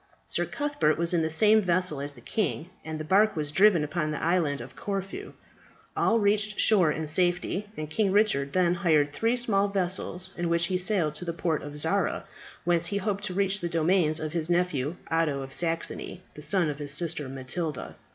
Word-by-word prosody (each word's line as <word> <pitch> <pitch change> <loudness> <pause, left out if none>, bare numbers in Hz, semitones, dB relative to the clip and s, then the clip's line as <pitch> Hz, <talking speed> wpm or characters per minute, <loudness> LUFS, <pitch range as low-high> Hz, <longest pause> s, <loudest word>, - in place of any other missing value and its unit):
Sir - - -2
Cuthbert 285 - 0
was 170 +1 +2
in 170 - +2
the 160 - 0
same 215 +7 +5
vessel 180 -5 +1
as 145 0 -2
the - - -15
king, 170 - -2
and 160 -1 -6
the - - -4
bark 205 +7 +3
was 150 -2 -2
driven 190 -1 +4
upon 155 +1 -2
the 150 - -3
Island 160 -4 +1
of - - -10
Corfu. 195 -1 -5 0.6
All 230 - +2
reached 210 0 +1
shore 185 -8 +4
in 160 +1 -3
safety, 175 +5 +2
and 155 - -4
King 195 +5 0
Richard 190 -10 +2
then 180 -2 +2
hired 160 -5 +2
three 230 +7 +1
small 205 -5 +1
vessels, 185 -1 -2
in 175 -1 -2
which 170 0 +2
he 185 +1 -1
sailed 180 -5 0
to 180 - -6
the 170 - -3
port 165 -1 -1
of 145 0 -8
Zara, 145 - 0 0.4
whence 175 0 +2
he 200 - -2
hoped 200 0 -2
to 185 - -5
reach 195 0 +1
the 175 -2 -3
domains 165 -1 +3
of 155 -1 -4
his 165 -1 -2
nephew, 175 -4 0 0.2
Otho 155 -4 0
of 135 0 -6
Saxony, 165 -1 -2
the 150 - -11
son 160 +3 +2
of 145 - -9
his 145 -1 -3
sister 155 -2 -1
Matilda. 135 +5 -5
170 Hz, 200 wpm, -27 LUFS, 155-195 Hz, 0.6 s, same